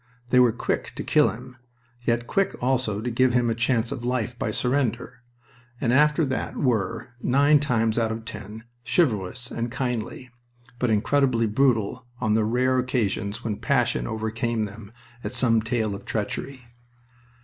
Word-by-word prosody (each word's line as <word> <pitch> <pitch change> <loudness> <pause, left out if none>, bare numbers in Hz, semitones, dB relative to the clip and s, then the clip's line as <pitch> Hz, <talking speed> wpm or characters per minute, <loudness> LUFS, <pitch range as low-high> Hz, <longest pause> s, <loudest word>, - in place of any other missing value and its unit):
They 125 - +5
were 125 -2 +6
quick 115 - -2
to - - -4
kill - - +4
him, 125 - -9 0.4
yet 120 0 0
quick 195 +9 0
also 125 -5 0
to 120 +2 -2
give 130 +1 +3
him 120 -1 +2
a - - +2
chance 115 0 0
of 120 - -5
life 125 -1 -1
by - - -1
surrender, 125 0 -1 0.6
and 120 -1 +1
after 150 +3 +4
that 130 -1 -3
were 115 -4 0
nine 145 +3 +4
times 115 -5 +1
out 115 -1 +1
of 110 0 -5
ten 105 +1 -8 0.2
chivalrous 120 - 0
and 120 +1 -2
kindly, 125 -1 -4 0.5
but 125 - +1
incredibly 115 +2 +2
brutal 120 +1 +1
on 110 -3 +1
the 110 0 +2
rare 130 +3 +2
occasions 115 -3 -1
when 110 -3 -2
passion 135 -4 +1
overcame 110 0 -1
them 100 0 -10 0.3
at 105 - -4
some 115 -3 +3
tale 110 -2 -1
of 100 - -7
treachery. 125 +4 -4
120 Hz, 160 wpm, -25 LUFS, 110-130 Hz, 0.6 s, were